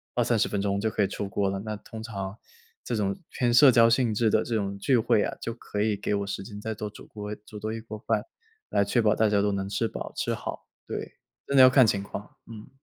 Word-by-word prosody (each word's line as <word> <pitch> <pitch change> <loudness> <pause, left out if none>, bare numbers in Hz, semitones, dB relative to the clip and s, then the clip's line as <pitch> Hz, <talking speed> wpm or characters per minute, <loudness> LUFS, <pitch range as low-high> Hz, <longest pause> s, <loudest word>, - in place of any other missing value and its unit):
20-30 - - +2
分 100 - -1
钟 100 0 0
就 110 - +1
可 105 - -1
以 - - +2
出 100 0 -4
锅 100 -1 0
了。 95 0 -2
那 105 -1 -4
通 110 +2 -9
常 100 -2 -5 0.5
这 120 - -4
种 100 -2 -1
偏 120 -3 +1
社 130 +1 +8
交 115 -2 +6
性 120 -2 +2
质 110 +1 +2
的 110 - +3
这 120 - -4
种 100 -2 -2
聚 125 +5 +2
会 105 -2 +3
啊， - - -3
就 115 - -3
可 105 -3 -5
以 105 -1 +2
给 105 - -2
我 100 0 -2
时 100 0 -4
间 105 -1 -9
再 110 +1 -3
多 105 0 -5
煮 105 - -13
锅 105 0 -6
煮 105 - -10
多 110 +1 -3
一 115 - -4
锅 110 -1 -8
饭， 110 -2 0 0.5
来 100 - +2
确 120 +4 +1
保 105 -1 +3
大 110 -1 +3
家 100 -1 +3
都 105 0 +1
能 95 0 -2
吃 115 +3 0
饱 - - -6
吃 - - -1
好， - - -7 0.2
对。 - - -5 0.3
真 140 - -1
的 130 - +9
要 130 - +9
看 130 -3 +6
情 100 -2 +1
况， 100 +1 -8 0.2
嗯。 110 -1 -10
105 Hz, 275 characters per minute, -27 LUFS, 100-115 Hz, 0.5 s, 的